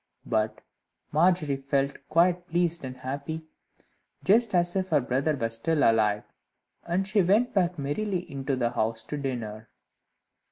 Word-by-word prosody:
But 110 0 -1 0.5
Margery 155 -3 +3
felt 140 0 0
quite 175 +2 +3
pleased 170 -1 0
and 130 -1 -6
happy, 140 +5 -5 0.8
just 220 0 +4
as 175 0 +2
if 190 -1 0
her 150 - +4
brother 135 +4 0
were 115 -4 -2
still 145 +7 +1
alive. 105 -2 +3 0.6
And 185 +3 0
she 210 0 +3
went 210 +7 +3
back 180 -3 +1
merrily 175 +7 -1
into 135 0 -2
the 120 -2 0
house 110 +1 -1
to 150 - -5
dinner. 115 -6 -5
145 Hz, 145 wpm, -27 LUFS, 125-175 Hz, 0.8 s, just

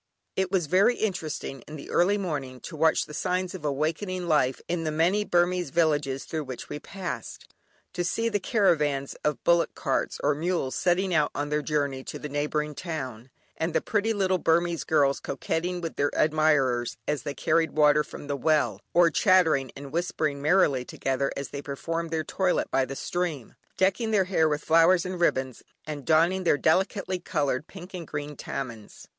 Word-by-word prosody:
It 190 -1 0
was 185 -4 +1
very 190 +9 +4
interesting 160 - -3
in 150 - -8
the 145 - -9
early 195 +4 +3
morning 145 -9 -4
to 165 - -8
watch 160 +1 +3
the 150 - -11
signs 180 +3 -1
of 185 -5 -8
awakening 165 +6 -2
life 135 -5 +2
in 170 -1 -1
the 155 - -1
many 170 +7 +2
Burmese 175 -3 +1
villages 145 -4 +1
through 155 -2 -4
which 130 -2 -7
we 150 - -5
passed. 150 - -7 0.4
To 175 - -1
see 225 +6 0
the 210 -3 0
caravans 150 - +1
of 150 -2 -1
bullock 170 0 +3
carts - - -1
or 150 - +3
mules 160 -3 -1
setting 185 +1 +1
out 150 -3 +3
on 145 0 -2
their 150 0 0
journey 140 -3 -1
to - - -6
the 150 - -6
neighbouring 150 +1 -1
town, 130 -8 -6 0.3
and 160 0 -2
the - - +5
pretty 215 +1 0
little 190 -3 +1
Burmese 170 0 +1
girls 140 -3 +2
coquetting 175 +5 -3
with 165 -1 -5
their 145 - +2
admirers 150 -6 +2
as 150 -3 0
they 140 +3 -5
carried 165 +2 +1
water 150 0 +5
from - - -10
the 145 0 -2
well, 155 +2 +1
or 170 -1 +6
chattering 160 - +3
and 140 0 -9
whispering 155 -3 -1
merrily 150 -5 +3
together 135 +2 -2
as 140 - -4
they 140 - -6
performed 165 +4 -4
their 160 -1 -1
toilet 185 +3 0
by 135 - +2
the 135 - -6
stream, 165 -7 -3 0.2
decking 190 +4 +2
their 210 -3 +3
hair 160 -4 +2
with 150 0 -2
flowers 165 +2 +5
and 185 -1 -4
ribbons, 130 -6 +1 0.2
and 145 -2 -6
donning 170 +4 +3
their 165 - +3
delicately 185 +5 +1
coloured 145 -4 -1
pink 190 0 -11
and 175 -4 -6
green 150 0 -5
"tamehns." 115 -6 -7
155 Hz, 185 wpm, -27 LUFS, 145-180 Hz, 0.4 s, or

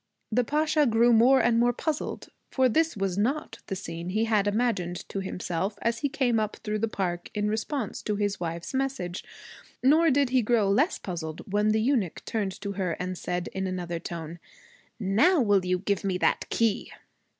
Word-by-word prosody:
The 245 +3 +3
Pasha 305 +3 +2
grew 235 +1 +4
more 250 +4 +6
and 235 -1 +3
more 240 +1 +3
puzzled, 305 +4 -3 0.2
for 260 -1 +3
this 320 +3 +1
was 195 -1 -1
not 270 +9 -1
the 195 - -3
scene 170 -2 -6
he 215 +4 +1
had 210 -3 +2
imagined 205 -5 -1
to 195 - -3
himself 190 +1 -3
as 230 0 0
he 285 - 0
came 245 -4 +1
up 215 -1 -2
through 210 0 -2
the 225 - +1
park 175 -5 -3
in 210 0 0
response 220 +2 -3
to 210 - -2
his 205 -1 -1
wife's 170 +3 -4
message. 260 -10 -2 0.6
Nor 315 +5 +5
did 280 -2 +2
he 255 -1 +4
grow 215 -3 +2
less 285 - +2
puzzled 170 +1 -6
when 210 +1 +3
the 215 +1 +3
eunuch 230 - 0
turned 200 -4 -2
to 200 - -3
her 185 -3 -2
and 185 +2 -4
said 180 0 -3
in 190 0 -2
another 175 -2 -3
tone, 165 0 -7 0.6
'Now 225 - +3
will 205 -6 +3
you 180 0 +1
give 200 +1 -1
me 190 -2 0
that - - +1
key?' 225 -1 0
210 Hz, 190 wpm, -27 LUFS, 185-245 Hz, 0.6 s, more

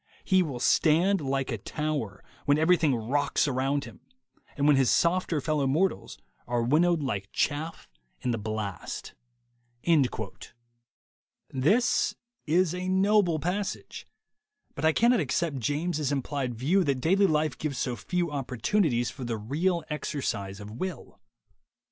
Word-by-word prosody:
He 190 -1 +3
will 140 -8 -3
stand 170 +9 +3
like 135 -1 -1
a 115 - -3
tower 145 -6 -3 0.2
when 145 0 +4
everything 160 -3 +3
rocks 140 +7 0
around 135 +1 0
him, - - -12 0.6
and 140 - +1
when 150 -1 +6
his 135 -2 +3
softer 170 -2 +2
fellow 150 -1 0
mortals 170 +8 0 0.3
are 120 -1 0
win 145 +7 +3
nowed 175 -3 +2
like 100 -7 -3
chaff 155 +3 -2 0.3
in 125 - 0
the 115 - -2
blastj' 105 -3 -5 2.4
This 200 - +2 0.3
is 170 +2 +3
a 180 +1 -3
noble 190 -2 +3
passage, 180 +6 -4 0.7
but - - -7
I 160 - +6
cannot 235 +7 +3
accept 155 -1 -1
James' 150 +3 -1
implied 135 -2 -2
view 160 - +2
that 140 -4 +1
daily 195 +8 +3
life 155 -1 +1
gives 145 -4 -4
so 125 - -1
few 175 +5 -2
oppor 135 -4 -5
tunities 120 - +1
for 130 - -8
the 120 -2 -2
real 160 - -1
exercise 105 -10 -3
of 105 0 -9
will. 180 +11 -6
150 Hz, 140 wpm, -28 LUFS, 130-175 Hz, 2.4 s, when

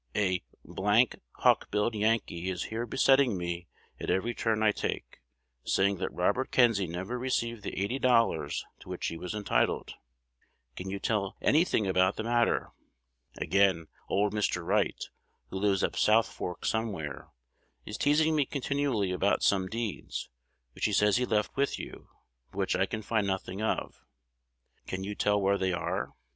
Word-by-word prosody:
A 95 -3 +2
d - - -37 0.2
d 105 +5 +3 0.3
hawk - - +4
billed 105 +3 0
Yankee 105 -5 0
is 90 -1 -2
here 120 +2 -2
besetting 135 -3 +4
me 85 0 -4 0.3
at - - -4
every 115 +6 +1
turn 110 -2 0
I 105 - +5
take, - - -4 0.4
saying 100 0 +2
that 95 - -3
Robert 100 +9 0
Kenzie 115 -7 +3
never 95 +9 -4
received 120 -3 -1
the - - -5
eighty 100 +8 -1
dollars 115 -10 +2
to - - -14
which - - -4
he - - -2
was 90 +3 -5
entitled. 105 -1 0 0.8
Can 95 +1 -6
you 100 - -3
tell 100 -1 -1
any 155 +3 +4
thing 110 - 0
about 95 +1 +2
the - - -3
matter? 120 +1 +1 0.7
Again, 95 -5 +2 0.2
old 105 +1 +1
Mr. 95 -5 0
Wright, - - +1 0.5
who 95 - -3
lives 100 -1 +2
up - - 0
South 110 +1 +4
Fork 90 - -6
somewhere, 100 -11 -2 0.6
is 105 - -6
teasing 155 +2 +3
me 150 - +4
continually 140 -8 -1
about 95 +2 +1
some 95 -2 +3
deeds, 115 -1 -4 0.4
which - - -2
he 105 - +1
says 105 +2 +4
he 125 0 0
left 105 -1 0
with 140 0 0
you, - - -9 0.4
but - - -15
which 95 -1 +1
I 95 +1 +2
can 110 +1 -4
find 110 -2 0
nothing 95 +1 -3
of. 110 - -2 0.9
Can 95 +1 -4
you 100 +2 -4
tell 105 0 +2
where 100 0 +2
they 95 -1 +1
are? 85 - -3
105 Hz, 170 wpm, -29 LUFS, 95-115 Hz, 0.9 s, I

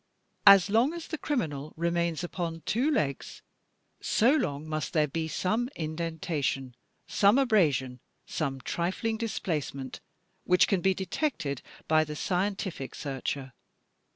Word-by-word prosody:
As 195 -2 +9
long 230 +9 +3
as 335 -1 -6
the 315 - -4
criminal 155 - -2
remains 170 0 0
upon 170 -2 -4
two 245 +10 +1
legs 140 - -2 0.6
so 235 +4 +3
long 150 - -1
must 155 0 -3
there 155 -3 +3
be 160 +3 -2
some 215 +9 0
indentation, 155 -5 -2 0.3
some 200 +4 +4
abrasion, 155 - +2 0.3
some 135 -4 -3
trifling 190 - -1
displacement 150 - -3 0.4
which 180 0 +4
can 195 -4 +1
be 190 +1 +3
detected 180 - -2 0.3
by 155 0 +4
the 150 -1 -6
scientific 185 -5 -2
searcher. 135 -1 -4
170 Hz, 125 wpm, -29 LUFS, 150-200 Hz, 0.6 s, As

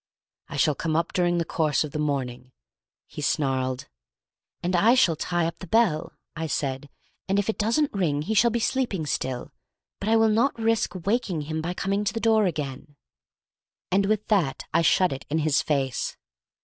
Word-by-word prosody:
"I 140 - -6
shall 150 +1 +3
come 155 +2 -2
up 165 +1 0
during 175 -1 +2
the 170 - 0
course 155 -2 +1
of 150 - -6
the 150 - -4
morning," 130 -4 -3 0.5
he - - -8
snarled. 130 -2 -1 0.8
"And 180 +1 0
I 220 +8 +5
shall 180 -11 +4
tie 175 +2 -1
up 165 - -4
the 185 - -8
bell," 195 -6 +2 0.2
I 160 +1 -3
said, 140 -1 -3 0.4
"and 195 - +2
if 205 +1 0
it - - -14
doesn't 235 +8 +1
ring 155 -7 0
he'll 220 +5 +3
be 235 +1 -1
sleeping 230 -9 -1
still, 130 -3 -3 0.5
but 205 - -2
I 225 - +4
will 225 0 +4
not 230 +6 +2
risk 225 -3 0
waking 200 -6 0
him 155 +2 -3
by 175 +3 -3
coming 200 +2 -1
to 205 - -1
the - - 0
door 220 -2 +3
again." 145 -2 -5 1.0
And 195 +1 +3
with 215 0 0
that 180 -11 +1
I 165 - +4
shut 180 +1 +3
it 135 - -8
in 155 - 0
his 155 -1 +2
face. 135 -4 -1
170 Hz, 190 wpm, -25 LUFS, 145-210 Hz, 1.0 s, I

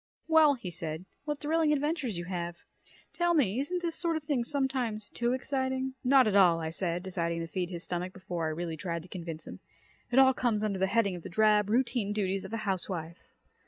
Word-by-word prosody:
"Well!" 315 -3 +6
he 195 -8 -7
said. 165 0 -4 0.2
"What 295 -1 -2
thrilling 315 +1 +2
adventures 295 - 0
you 175 - -4
have. 175 -1 -4 0.6
Tell 345 -1 +2
me, 240 -6 +2
isn't 355 +6 -1
this 335 -1 0
sort 335 -1 +2
of 315 - -6
thing 285 -5 0
sometimes 255 -6 -1
too 240 +1 0
exciting?" 260 0 -1
"Not 260 0 +6
at 210 -2 +1
all," 175 -4 +6
I 160 -1 -3
said, 175 0 -1
deciding 170 -3 -2
to - - -3
feed 180 0 -3
his 175 -2 -6
stomach 180 +1 -3
before 175 -3 -4
I - - 0
really 165 0 -4
tried 170 0 -3
to - - -13
convince 165 -3 -6
him. - - -9 0.5
"It 250 - 0
all 265 0 +7
comes 230 -4 0
under 200 -3 -1
the 190 - +2
heading 200 -2 +2
of 175 - -7
the - - -8
drab, 210 +2 +3
routine 235 -3 +1
duties 195 -2 -1
of 190 - -8
a - - 0
housewife. 180 -3 -3
210 Hz, 215 wpm, -30 LUFS, 175-265 Hz, 0.6 s, all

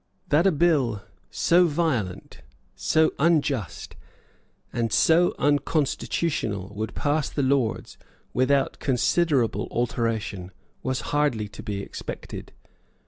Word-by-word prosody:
That 165 +6 +4
a - - +5
bill 140 - +2 0.3
so 175 +1 +3
violent, 145 - -2 0.3
so 160 0 +2
unjust, 145 - 0 0.8
and 115 -2 -1
so 170 +8 +4
unconstitutional 145 - 0
would 110 +2 -4
pass 145 0 0
the 145 - -2
Lords 130 -4 0 0.3
without 135 +2 +1
considerable 135 -1 +1
alteration 115 -6 -2 0.3
was 130 0 -2
hardly 145 -8 +1
to 105 - -10
be 100 -2 -4
expected. - - -7
135 Hz, 100 wpm, -25 LUFS, 110-155 Hz, 0.8 s, a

